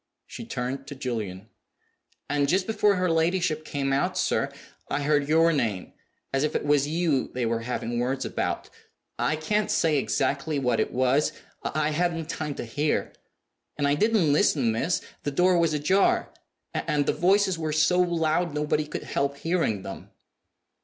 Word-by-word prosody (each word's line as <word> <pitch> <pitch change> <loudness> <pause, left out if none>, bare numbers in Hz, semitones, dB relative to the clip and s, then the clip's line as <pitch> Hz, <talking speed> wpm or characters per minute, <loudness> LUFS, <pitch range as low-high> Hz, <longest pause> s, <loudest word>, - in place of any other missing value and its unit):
(She 230 - -8
turned 135 - -4
to 145 - -7
Julian.) 110 -6 -4 0.8
"And 145 0 +1
just 185 +3 +2
before 210 -1 +2
her 185 0 +1
ladyship 165 -1 +1
came 140 -3 -2
out, 140 - 0
sir, - - +1 0.4
I 145 - -1
heard 145 0 +1
your 165 +1 +4
name, 110 - -2 0.4
as 135 +1 +1
if 150 - -1
it - - -1
was 145 -1 +3
you 155 -4 +1
they 125 -2 0
were 115 0 0
having 120 0 -3
words 130 +2 -1
about. - - -3 0.5
I 155 - +1
can't 210 +7 0
say 155 -4 +2
exactly 140 +3 -1
what 125 -4 +1
it - - 0
was; 130 +4 +2 0.3
I 155 0 0
hadn't 165 0 -1
time 145 -2 -4
to - - -5
hear. 145 +6 -1 0.6
And 145 -1 +1
I 140 - +3
didn't 195 -3 +3
listen, 145 - +3
miss; 140 +11 0 0.2
the - - -2
door 180 +5 +3
was 165 -2 +2
ajar; 185 +7 +2 0.4
and 145 -1 0
the - - +1
voices 190 0 +2
were 155 -1 -2
so 155 +4 +3
loud 170 -2 +1
nobody 150 0 0
could 150 - -5
help 140 0 -1
hearing 160 - 0
them." - - -8
150 Hz, 165 wpm, -26 LUFS, 135-170 Hz, 0.8 s, your